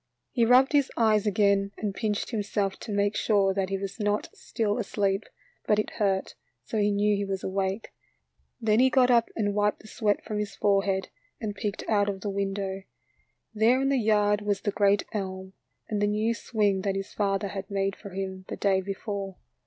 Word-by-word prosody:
He 235 -3 +2
rubbed 255 +2 +6
his 285 -2 +3
eyes 215 -2 +3
again 200 -1 +2
and 210 -2 -2
pinched 210 +3 -2
him 220 -3 -1
self 200 -1 -2
to 220 - -7
make 205 +1 +1
sure 200 -3 +2
that 190 -1 -1
he 195 - -1
was 195 +3 -6
not 210 0 0
still 215 0 -2
asleep, 200 -2 0 0.4
but 210 - +4
it 215 - -1
hurt, 195 -2 0 0.3
so 215 - -3
he 205 0 +3
knew 205 +1 +2
he 200 - -1
was 195 -1 -3
awake. 190 +2 -2 0.7
Then 220 -1 +2
he 260 +1 +6
got 255 -1 +4
up 235 -1 +4
and 205 -2 0
wiped 210 0 +1
the 215 - -14
sweat 210 -2 0
from 210 -1 -3
his 210 -1 -4
forehead 195 -1 +1 0.3
and 215 -3 -3
peeked 210 -1 -4
out 205 -2 +2
of 195 -1 -4
the 205 - -2
window. 195 -1 -2 0.7
There 225 +4 +4
in 270 0 +1
the 275 -2 +2
yard 210 -2 +2
was 205 -1 -1
the 205 - -1
great 200 0 +3
elm 190 -2 -4 0.3
and 210 -1 -2
the 205 - +3
new 215 +2 +1
swing 210 -4 0
that 195 0 -1
his 195 0 -5
father 200 -1 0
had 195 0 -6
made 195 -1 -1
for 200 - -10
him 190 0 -5
the - - -5
day 195 -2 +2
before. 195 0 -5
205 Hz, 200 wpm, -27 LUFS, 195-215 Hz, 0.7 s, rubbed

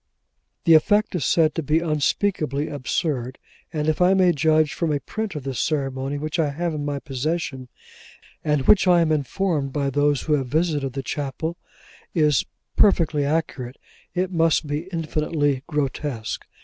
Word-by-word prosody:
The 165 - +5
effect 205 +7 +4
is 175 -8 -1
said 160 -2 +3
to 165 - -2
be 150 +1 +1
unspeakably 155 -2 0
absurd: 130 -2 -2 0.3
and 150 -1 -2
if 155 +2 0
I 185 +2 +5
may 185 -2 +5
judge 155 0 +2
from 165 -3 -1
a 145 - 0
print 220 +3 -5
of 150 - -5
this 135 -2 -4
ceremony 135 -2 -1
which 155 +3 -3
I 155 -3 +2
have 165 +4 -2
in 150 -1 -3
my 145 -1 -2
possession; 140 -1 -3 0.8
and 150 -3 +1
which 195 -2 +5
I 175 -1 +6
am 160 -1 +2
informed 150 -1 -1
by 140 -2 0
those 145 0 +1
who 155 - 0
have 135 -3 +1
visited 145 -2 0
the 135 0 -4
chapel, 150 +5 -3 0.6
is 150 -5 +3 0.3
perfectly 160 -7 +3
accurate; 140 -4 -2 0.4
it 185 +1 0
must 165 -3 +2
be 150 +4 -3
infinitely 155 -4 -1
grotesque. 140 -5 -3
150 Hz, 160 wpm, -23 LUFS, 140-165 Hz, 0.8 s, I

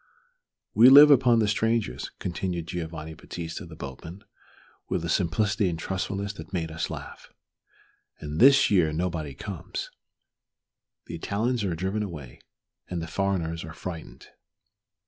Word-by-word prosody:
"We 115 +4 +8
live 145 +2 +10
upon 125 -3 +5
the 110 -2 +2
strangers," 110 - 0
continued 90 -1 -3
Giovanni 80 -2 -6
Battista, 85 +3 -7
the 80 - -11
boatman, 80 +7 -9 0.7
with 85 - -1
a - - -3
simplicity 100 +3 +1
and 85 - -3
truthfulness 95 +3 -3
that 80 -1 -11
made 80 -3 -2
us 80 0 -3
laugh; - - -9 0.9
"and 75 0 -5
this 135 -1 +6
year 90 -6 +4
nobody 80 -4 -3
comes. - - -6 1.1
The - - -9
Italians 110 +7 -1
are 90 -4 -1
driven 95 +5 -2
away, 75 -11 -7 0.5
and 90 - -3
the 80 - -4
foreigners 85 -2 -2
are 80 0 -8
frightened." 80 -7 -8
90 Hz, 135 wpm, -26 LUFS, 80-105 Hz, 1.1 s, live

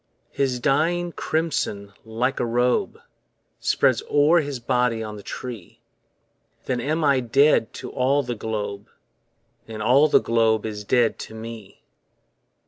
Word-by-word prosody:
His 130 -3 -1
dying 165 +6 +1
crimson 145 -13 -2
like 120 +4 -2
a - - 0
robe 120 +1 0 0.6
Spreads - - +2
o'er 150 +4 +4
his 145 -4 -4
body 125 -2 0
on 105 -1 -6
the 105 - -9
tree, 115 -3 -8 0.9
Then 125 -2 -1
am 155 +5 -1
I 140 -3 +4
dead 130 0 +3
to - - -8
all 140 +2 +1
the 125 -1 -3
globe, 105 -2 -5 0.8
And 110 -1 -7
all 135 +7 +5
the - - +5
globe 110 -2 +1
is 105 -1 -5
dead 120 +1 +1
to 110 - -8
me. 110 -2 -10
125 Hz, 135 wpm, -23 LUFS, 110-140 Hz, 0.9 s, all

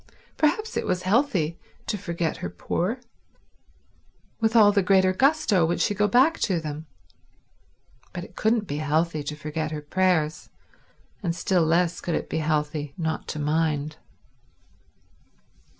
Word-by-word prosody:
Perhaps 430 +10 0
it - - -2
was 180 0 -1
healthy 185 - +1 0.3
to 215 - -1
forget 170 -5 -3
her 85 - -4
poor; 180 - -2 1.4
with 225 0 +1
all 210 -3 +7
the 200 -1 +3
greater 190 0 +4
gusto 265 - +3
would 170 +2 0
she 205 - +2
go 210 +1 +2
back 260 +10 +4
to 185 -4 +1
them. 155 0 -6 1.2
But 175 - -6
it - - -13
couldn't 220 0 +1
be 145 -5 -4
healthy 155 +1 0
to 145 +1 -5
forget 155 +1 -4
her 155 -1 -4
prayers, 160 -1 0 0.7
and 170 -4 -1
still 180 -1 +1
less 170 +2 +1
could 170 - -2
it - - -4
be 160 - 0
healthy 150 -2 -1
not 160 -2 -3
to - - -4
mind. 150 0 0
170 Hz, 145 wpm, -25 LUFS, 155-205 Hz, 1.4 s, all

